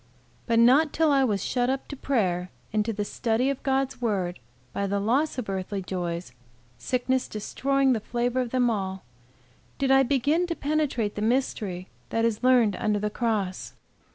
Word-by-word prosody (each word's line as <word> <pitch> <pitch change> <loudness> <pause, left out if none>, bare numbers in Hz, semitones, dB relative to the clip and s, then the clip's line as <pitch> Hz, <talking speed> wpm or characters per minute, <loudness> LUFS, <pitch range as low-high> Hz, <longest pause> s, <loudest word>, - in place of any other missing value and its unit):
But 230 - +2
not 265 +6 +5
till 320 -1 +3
I 275 -1 +4
was 205 -7 0
shut 245 -1 0
up 265 0 -2
to 285 - -5
prayer 185 -10 0 0.2
and 215 -1 +2
to 225 - -1
the 205 -1 -3
study 235 +5 0
of 275 - -5
Gods 270 -1 -1
word 190 -6 -1 0.3
by 200 - -1
the 200 +1 0
loss 260 +10 +1
of 250 - -3
earthly 195 0 -3
joys, 175 -4 -4 0.5
sickness 255 0 0
destroying 270 +5 0
the 225 - 0
flavor 240 +3 -1
of 245 - -3
them 250 0 +2
all, 190 -3 -3 0.7
did 270 -1 +1
I 270 0 +7
begin 285 +6 +1
to 335 - -2
penetrate 285 -9 -1
the 210 - -5
mystery 215 -6 -1 0.2
that 230 0 +1
is 225 -2 0
learned 245 -6 +4
under 215 -2 0
the 210 +1 -2
cross. 210 -6 -2
235 Hz, 180 wpm, -26 LUFS, 205-265 Hz, 0.7 s, I